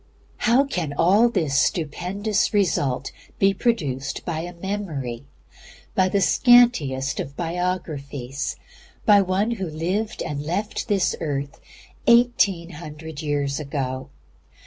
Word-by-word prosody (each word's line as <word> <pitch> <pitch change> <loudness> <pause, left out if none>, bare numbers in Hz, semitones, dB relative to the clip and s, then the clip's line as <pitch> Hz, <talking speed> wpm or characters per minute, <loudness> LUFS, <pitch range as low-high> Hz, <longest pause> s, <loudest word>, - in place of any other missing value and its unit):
How 245 +4 +4
can 170 - -3
all 200 +9 +5
this 160 -11 -1
stupendous 195 +9 0
result 150 -10 +1 0.3
be 195 0 +4
produced 140 - -1
by 165 -3 -2
a 175 +2 -5
Memory, 165 - -4 0.7
by 185 0 +3
the 200 +1 +1
scantiest 185 - +4
of - - -2
all 140 - -16
Biographies, 155 -7 -3 0.5
by 205 -1 +7
One 195 +4 0
who 195 -7 -3
lived 180 +8 -2
and 145 -3 -4
left 180 +8 -3
this 200 -4 +1
earth 145 -3 -3 0.5
eighteen 235 -8 +4
hundred 155 -1 -8
years 145 -2 -1
ago? 135 -2 -4
170 Hz, 120 wpm, -23 LUFS, 145-200 Hz, 0.7 s, by